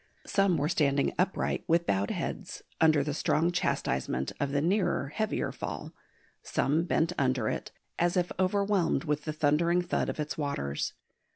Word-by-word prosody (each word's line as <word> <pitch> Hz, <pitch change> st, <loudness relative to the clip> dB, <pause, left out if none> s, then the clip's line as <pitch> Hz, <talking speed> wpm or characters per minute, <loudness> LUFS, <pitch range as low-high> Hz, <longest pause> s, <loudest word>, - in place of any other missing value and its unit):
Some 195 Hz, -4 st, +2 dB
were 145 Hz, 0 st, +1 dB
standing 140 Hz, -4 st, +2 dB
upright, 190 Hz, +1 st, 0 dB
with 170 Hz, +1 st, +3 dB
bowed 100 Hz, +1 st, +1 dB
heads, -, -, -4 dB, 0.2 s
under 155 Hz, -3 st, +5 dB
the 150 Hz, 0 st, -2 dB
strong 160 Hz, +3 st, +1 dB
chastisement 65 Hz, -, -1 dB
of 140 Hz, -, 0 dB
the 140 Hz, -, +1 dB
nearer 175 Hz, -4 st, +1 dB
heavier 215 Hz, +8 st, -1 dB
fall; -, -, -6 dB, 0.5 s
some 155 Hz, +5 st, +1 dB
bent 165 Hz, 0 st, +1 dB
under 130 Hz, -4 st, +1 dB
it, -, -, -3 dB, 0.3 s
as 175 Hz, +2 st, +2 dB
if 180 Hz, -1 st, +1 dB
overwhelmed 195 Hz, -2 st, +2 dB
with 150 Hz, -2 st, -1 dB
the 155 Hz, -, -2 dB
thundering 165 Hz, +4 st, +2 dB
thud 175 Hz, -, -1 dB
of -, -, -4 dB
its 150 Hz, +1 st, -3 dB
waters. 75 Hz, -, -2 dB
155 Hz, 160 wpm, -29 LUFS, 140-175 Hz, 0.5 s, under